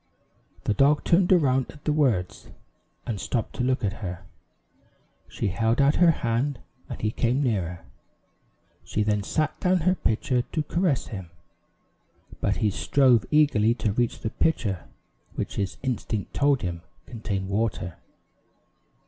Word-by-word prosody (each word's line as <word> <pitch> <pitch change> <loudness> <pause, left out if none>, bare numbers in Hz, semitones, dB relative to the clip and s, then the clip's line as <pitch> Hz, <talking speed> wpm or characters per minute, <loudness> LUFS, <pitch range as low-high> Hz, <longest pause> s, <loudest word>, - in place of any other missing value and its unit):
The - - +1
dog 140 +5 +3
turned 175 +2 +3
around 135 -7 +3
at 145 - -14
the 150 - +2
words, 120 - 0 0.6
and 110 -6 -3
stopped 115 -4 -2
to - - 0
look 130 -1 0
at 100 - -1
her. 90 -2 -6 1.0
She - - -2
held 115 +5 +1
out 140 +2 +4
her 175 -1 +6
hand, 130 -1 0 0.3
and - - -6
he 110 - 0
came 125 +5 +1
nearer. 90 -8 -2 1.0
She 105 - -1
then 105 -1 +1
set 155 +9 -1
down 180 -1 +2
her 185 +3 +3
pitcher 125 -4 0
to 155 +5 -3
caress 170 -3 0
him, 95 -5 -7 1.1
but 100 - +1
he 105 -2 +1
strove 125 +2 +3
eagerly 120 -7 +3
to 110 -4 -1
reach 120 +1 -1
the 110 - -3
pitcher 100 - 0 0.5
which - - -4
his 100 -2 -2
instinct 110 -5 -3
told 140 -5 +2
him 85 -1 -3 0.2
contained 100 -5 -4
water. 100 -5 -2
120 Hz, 145 wpm, -26 LUFS, 105-145 Hz, 1.1 s, her